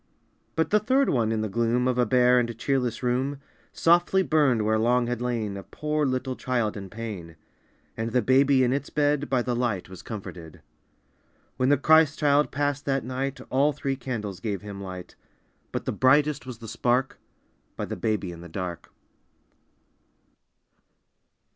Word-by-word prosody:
But 160 -1 0
the 210 - +5
third 260 +6 +2
one 115 -4 +1
in 110 -1 0
the 110 - -1
gloom 120 +4 +1
Of 125 -1 0
a 120 - +3
bare 125 +1 +4
and 120 -2 -2
cheerless 125 -1 -1
room 130 +3 0 0.3
Softly 175 +3 +3
burned 145 -10 +2
where 110 0 +2
long 120 +2 +2
had 120 0 -3
lain 115 -5 -2
A 100 - -6
poor 150 +7 -2
little 130 0 -2
child 120 -5 -1
in 100 -2 -7
pain, 105 -7 -7 0.6
And 110 +1 -3
the 125 0 +1
baby 130 +2 +4
in 125 0 +2
its 140 +1 -3
bed 145 -1 +1
By 130 -2 +1
the 125 0 -1
light 120 -8 -1
was 95 -2 -10
comforted. 90 -7 -9 0.9
When 130 0 +2
the 145 - +5
Christ 155 +1 +4
child 145 0 +3
passed 145 0 -1
that 135 -1 0
night 135 +2 -3
All 140 +3 +3
three 135 -1 -2
candles 115 -7 -5
gave 100 -1 -4
Him 100 -1 -7
light, 95 -2 -8 0.6
But - - -4
the - - -1
brightest 135 +3 +2
was 125 -3 -7
the 115 - -10
spark 125 +4 0 0.6
By - - -3
the - - -5
baby 105 -5 -1
in 85 -1 -10
the 85 - -10
dark. 90 0 -6
125 Hz, 170 wpm, -26 LUFS, 110-140 Hz, 0.9 s, the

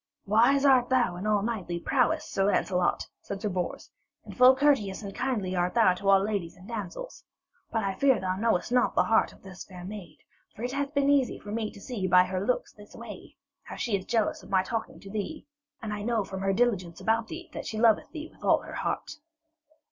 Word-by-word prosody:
'Wise 240 +7 +4
art 255 -3 +5
thou 245 -8 +2
in 185 +4 -4
all 210 -2 +2
knightly 195 -7 -3
prowess, 275 - +1
Sir 195 - 0
Lancelot,' 185 -3 +1 0.2
said 200 - -6
Sir 210 +1 -2
Bors, 180 -2 -4 0.3
'and - - -10
full 255 +1 +7
courteous 260 -9 +2
and 200 -1 -6
kindly 215 -8 -2
art 180 +2 0
thou 220 -6 +5
to 195 +2 -2
all 195 -1 +7
ladies 200 -5 -3
and 185 +2 -14
damsels. 225 - -6 0.5
But 225 -2 0
I 195 -1 -1
fear 265 +3 +3
thou 185 0 -1
knowest 220 0 0
not 250 0 +2
the - - +4
heart 225 - +2
of - - -20
this 190 -2 -9
fair 180 -2 -11
maid. 185 -6 -9 0.4
For 220 - -8
it 245 - -2
hath 280 +2 -3
been 280 0 +3
easy 275 -4 +2
for 205 - -9
me 220 0 -2
to - - -13
see 200 -3 -3
by 180 0 +6
her 185 +1 -3
looks 250 +4 -1
this 205 0 -15
way - - -10 0.3
how - - -9
she 230 -4 -1
is 190 -1 -4
jealous 225 -3 0
of - - -15
my 190 -1 +3
talking 225 +3 -4
to 195 - -10
thee, 215 +10 -4 0.4
and 215 -1 -3
I 205 - -4
know 225 0 0
from 190 0 -6
her 195 0 +1
diligence 195 -6 0
about 225 +3 +1
thee 340 +3 -8
that - - -6
she 220 - -4
loveth 225 -1 +3
thee 315 -1 -7
with - - -20
all - - +3
her - - -9
heart.' 315 - -3
210 Hz, 225 wpm, -28 LUFS, 190-245 Hz, 0.5 s, full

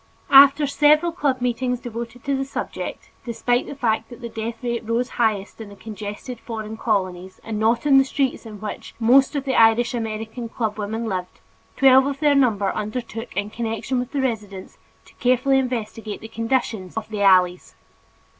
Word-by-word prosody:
After 280 +2 +8
several 300 +4 +3
club 280 -6 -1
meetings 250 0 -1
devoted 235 0 -7
to 280 -1 0
the 270 - -1
subject, 270 - -6
despite 245 +1 -1
the - - -7
fact 225 -4 -1
that 240 - -11
the 235 - -6
death 225 +2 -6
rate 235 -1 -2
rose 230 +3 -1
highest 215 -2 -1
in 215 - -8
the 200 - -12
congested 210 +3 -7
foreign 220 -2 -6
colonies 190 -4 -2
and 220 -2 -4
not 230 +4 +1
in 275 -2 +6
the - - +5
streets 270 -1 -1
in 210 -2 -10
which 210 +1 -7
most 265 +5 +4
of 280 -1 -2
the 265 - 0
Irish 230 +2 +4
American 225 0 -4
club 220 -2 -3
women 220 +3 -3
lived, 185 -4 -4 0.4
twelve 265 0 +6
of 280 -1 -3
their 295 -1 +4
number 220 -8 +2
undertook 225 0 -5
in 205 +1 -2
connection 230 +3 -2
with 245 +1 -4
the 280 - -1
residents, 210 -7 -4 0.3
to - - -20
carefully 255 +2 +3
investigate 225 -4 -4
the 220 - -9
conditions 225 -4 -2
of 220 - -3
the 210 -2 -4
alleys. 180 -2 +3
230 Hz, 180 wpm, -22 LUFS, 215-260 Hz, 0.4 s, After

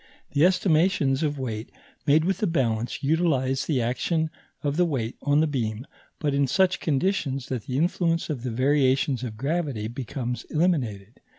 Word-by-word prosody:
The 145 +1 +2
estimations 165 -6 +2
of 150 -2 0
weight 115 -4 -4 0.4
made 155 +3 +5
with 190 +1 0
the 215 - +1
balance 120 -8 -1
utilize 140 -4 +1
the 135 -7 +1
action 155 +7 0 0.3
of 145 -1 0
the 180 - +3
weight 130 -9 -2
on 145 +1 +3
the - - +4
beam, 120 -5 -2 0.3
but 145 -3 -1
in 140 0 +2
such 190 +7 +2
conditions 140 -4 -1
that 125 -5 -3
the 130 - -2
influence 165 +1 +1
of 145 -6 -3
the 125 - -3
variations 130 +1 +2
of 110 -4 -5
gravity 140 -5 -1
becomes 125 +1 -4
eliminated. 125 - -1
140 Hz, 165 wpm, -25 LUFS, 125-160 Hz, 0.4 s, made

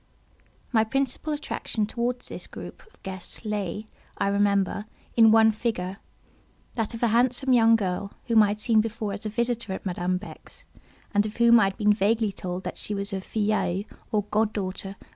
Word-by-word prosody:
My 220 -3 +4
principal 270 +6 -1
attraction 290 -7 -2
towards 240 +3 -2
this - - -8
group - - -9
of 440 - -26
guests 190 +3 -6
lay, 210 -1 -3 0.3
I 200 - +1
remember, 200 0 +1 0.3
in 225 -1 +7
one 220 0 +6
figure—that 215 +2 -6
of 230 - -5
a 235 - +4
handsome 250 +3 +2
young 230 -1 +6
girl 200 -1 -2
whom 230 -2 +5
I 210 - +5
had 205 +1 -2
seen 220 0 +4
before 220 -2 -3
as 210 +2 -5
a - - -2
visitor 235 -2 -1
at 190 - -7
Madame 180 0 0
Beck's, 205 +3 -9 0.5
and 205 0 +4
of 215 - -9
whom 235 0 +7
I 210 - +5
had 195 0 -2
been 210 -2 +4
vaguely 215 +1 +2
told 185 -1 -5
that - - -5
she 210 - -2
was 200 +1 -3
a 190 - -2
"filleule," 200 -2 0 0.3
or 210 -2 +2
god 215 0 +2
daughter, 195 -1 -3
of 195 - -9
M. - - -24
215 Hz, 190 wpm, -26 LUFS, 200-230 Hz, 0.5 s, in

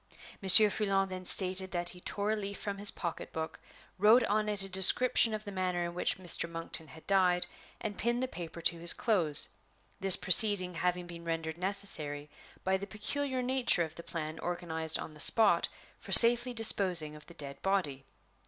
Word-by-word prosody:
Monsieur 205 +2 +7
Foulon 195 -2 -3
then 185 0 -9
stated 190 0 0
that 175 -1 -6
he 180 - -14
tore 205 +3 -5
a - - -2
leaf 200 -1 -8
from 200 -1 -8
his 205 0 0
pocketbook, 160 -2 -8 0.4
wrote 220 +5 +3
on 215 0 -3
it 205 -2 -5
a - - -2
brief 195 - -11
description 225 +5 +4
of 215 0 -8
the 205 - -9
manner 180 -2 -5
in 170 - -8
which 180 - -3
Mr. 175 -2 -2
Monkton 165 -1 -7
had 160 +1 -18
died, 180 -2 0 0.3
and 210 -2 -9
pinned 240 +2 -3
the - - -4
paper 170 -6 -11
to 170 0 -1
his 170 0 0
clothes; 175 - -1 0.5
this 195 -1 +7
proceeding 190 -1 +4
having 180 +1 -4
been 170 -1 -13
rendered 165 0 -7
necessary 155 -7 -2 0.3
by 190 0 -2
the 200 +1 -10
peculiar 255 +6 -6
nature 250 -8 -1
of 160 -1 -10
the 170 - -12
plan 160 -1 -9
organized 160 -2 -4
on 155 - -10
the 150 - -18
spot 220 +8 +4 0.3
for - - -14
safely 240 +1 +9
disposing 185 -9 +1
of 150 - -17
the 170 - -16
dead 140 -1 -10
body. 180 -9 -4
185 Hz, 190 wpm, -28 LUFS, 170-205 Hz, 0.5 s, safely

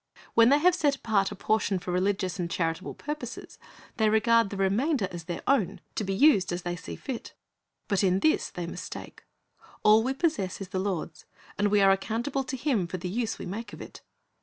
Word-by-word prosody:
When 230 0 +6
they 285 - +6
have 355 +4 +4
set 290 -5 +2
apart 210 -7 +1
a - - -6
portion 210 -1 +1
for 180 0 -5
religious 185 0 0
and 170 -1 -2
charitable 165 +2 -2
purposes, 295 -5 -7 0.4
they 220 -1 +3
regard 230 0 +4
the 200 - -6
remainder 205 - +1
as 170 -2 -7
their 175 -1 -5
own, 260 -10 +1
to - - -2
be 195 - -2
used 210 -7 +4
as 175 0 -3
they 175 0 -2
see 175 - -8
fit. 260 -5 -7 0.5
But 200 -1 +1
in 190 0 +2
this 310 - +2
they 175 - -5
mistake. 170 - -8 0.6
All 215 +1 +7
we 260 +4 -1
possess 290 - -1
is 195 -2 -7
the 190 -1 -2
Lord's, 185 -5 -3 0.3
and 205 - +1
we 205 0 +3
are 195 0 +6
accountable 230 +8 -1
to 265 -1 -4
Him 235 - 0
for 185 - -4
the 180 +1 -5
use 225 +3 -2
we - - -7
make 215 +6 -6
of - - -9
it. - - -10
205 Hz, 210 wpm, -28 LUFS, 185-245 Hz, 0.6 s, All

